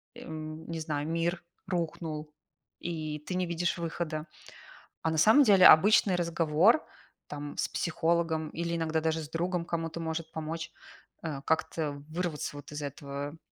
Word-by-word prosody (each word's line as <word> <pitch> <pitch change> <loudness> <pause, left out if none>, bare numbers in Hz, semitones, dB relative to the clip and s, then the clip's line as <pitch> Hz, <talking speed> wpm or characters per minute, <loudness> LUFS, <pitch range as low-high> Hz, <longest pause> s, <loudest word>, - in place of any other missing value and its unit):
эм, 155 0 -7
не 165 -1 -3
знаю, 150 -2 -2
мир 170 +2 -1 0.2
рухнул, 160 -3 -3 0.5
и 155 -3 -4
ты 165 +5 -5
не 180 0 +1
видишь 170 0 -1
выхода. 165 -2 -3 0.7
А 160 - 0
на 160 - -1
самом 220 - +7
деле 195 -5 +7
обычный 195 +2 +7
разговор, 170 - +3 0.4
там, 145 0 -6
с - - +1
психологом 165 -1 0
или 170 +1 -2
иногда 160 -1 0
даже 160 0 0
с 150 - -9
другом 170 +1 -1
кому-то 165 -1 -3
может 160 0 -3
помочь, 160 +1 -4 0.5
э, 150 -4 -4
как-то 155 -2 -1
вырваться 165 -3 -3
вот 145 +1 -10
из 150 0 -5
этого 140 +2 -5
160 Hz, 145 wpm, -30 LUFS, 155-170 Hz, 0.7 s, самом